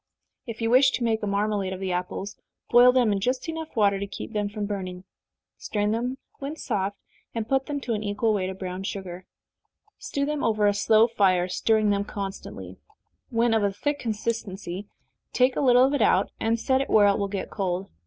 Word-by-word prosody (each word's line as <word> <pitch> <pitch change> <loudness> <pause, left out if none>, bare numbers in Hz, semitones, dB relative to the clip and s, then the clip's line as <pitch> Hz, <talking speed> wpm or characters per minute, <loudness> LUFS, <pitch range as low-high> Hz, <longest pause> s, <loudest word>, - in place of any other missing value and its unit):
If 230 0 -5
you 225 - +1
wish 260 +2 +6
to 245 - -1
make 225 -1 +1
a 210 - -2
marmalade 200 -1 0
of 185 - -6
the 190 -1 -2
apples, 185 +3 -3 0.4
boil 245 +1 +8
them 250 -4 +3
in 200 - 0
just 255 +9 -1 0.3
water 200 -3 +3
enough - - -7
to - - -8
keep - - -7
them 205 -1 -1
from 210 0 -4
burning 185 -3 -5 0.6
strain 210 0 -1
them 245 +4 -2 0.2
when 280 +3 -5
soft, 200 -8 -2 0.4
and 225 -1 -2
put 270 +1 +1
to 295 - -4
them 245 -5 -2
an 210 - -5
equal 210 +2 0
weight 190 -3 -1
of 190 - -7
brown 185 -1 -5
sugar 185 -2 -6 0.7
stew 280 0 -2
them 300 0 -2
over 215 -2 +2
a 205 - +4
slow 220 +3 +4
fire, 190 -6 +2
stirring 215 +3 +2
them 200 0 +1
constantly. 200 -1 -7 0.5
When 235 -1 +2
of 220 - +3
a 200 - +2
thick 290 +9 -2
consistency, 205 -4 -4 0.5
take 255 0 +3
a - - 0
little 250 -2 +6
of 275 - 0
it 285 - +1
out, 195 -2 +3
and 230 +1 0
set 260 +3 +2
it 275 - -4
where 210 -2 +6
it 200 0 +3
will 200 - 0
get 195 -1 -5
cold. 190 -1 -2
210 Hz, 210 wpm, -25 LUFS, 195-235 Hz, 0.7 s, boil